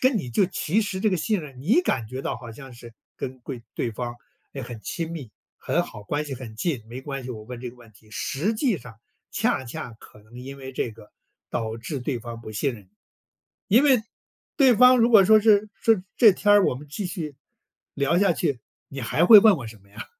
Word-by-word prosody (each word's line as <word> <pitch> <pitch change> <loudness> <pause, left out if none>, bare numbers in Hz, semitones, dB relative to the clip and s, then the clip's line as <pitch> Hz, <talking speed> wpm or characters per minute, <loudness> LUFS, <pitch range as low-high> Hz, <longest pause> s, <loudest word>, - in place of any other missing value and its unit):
跟 255 -4 +3
你 125 - -5
就 195 - +3
其 175 +3 0
实 195 -2 -4
这 215 - +2
个 185 - +1
信 200 +4 0
任， 140 -5 -11
你 220 - +3
感 115 - -1
觉 130 +3 -5
到 - - -3
好 115 - -10
像 135 +2 -12
是 120 -1 -13 0.2
跟 130 0 -6
贵 120 -1 -7
对 120 - -2
方 120 +2 -5 0.4
也 140 - -6
很 120 -2 -8
亲 165 -1 -4
密、 140 -10 -7 0.3
很 - - 0
好、 105 - -10
关 145 +8 -2
系 140 - -5
很 120 -4 -9
近， 140 -4 -2
没 125 +3 -7
关 135 0 -6
系， 125 - -7
我 110 -3 -8
问 120 +1 -8
这 125 -1 -6
个 125 - -20
问 120 -2 -17
题， 110 +1 -22
实 145 - -2
际 225 -2 +1
上 120 -3 -13 0.3
恰 130 - 0
恰 120 0 -7
可 105 - -17
能 115 +3 -14
因 135 +2 -9
为 135 0 -8
这 125 - -2
个， 105 -1 -16 0.4
导 110 -1 -3
致 130 +4 -5
对 125 0 -2
方 115 0 -8
不 110 - -9
信 120 +4 -1
任 105 - -13
你。 95 - -28 0.8
因 240 +8 +5
为 260 -6 +4 0.5
对 265 -4 +5
方 250 +1 +7
如 235 +1 +4
果 205 -4 +7
说 215 +2 +6
是， 210 -1 +4
说： 225 - +3 0.2
“这 220 -4 +8
天 205 +2 +2
儿 205 -1 +6
我 - - +1
们 145 +3 -10
继 190 +6 -4
续 160 -7 -6 0.6
聊 140 +5 +1
下 195 -2 +4
去， 140 -6 -1 0.3
你 135 - -7
还 150 +8 +1
会 215 +2 +10
问 210 -1 +6
我 120 - -7
什 110 -2 -11
么 100 - -25
呀？” 105 - -9
135 Hz, 250 characters per minute, -24 LUFS, 120-195 Hz, 0.8 s, 会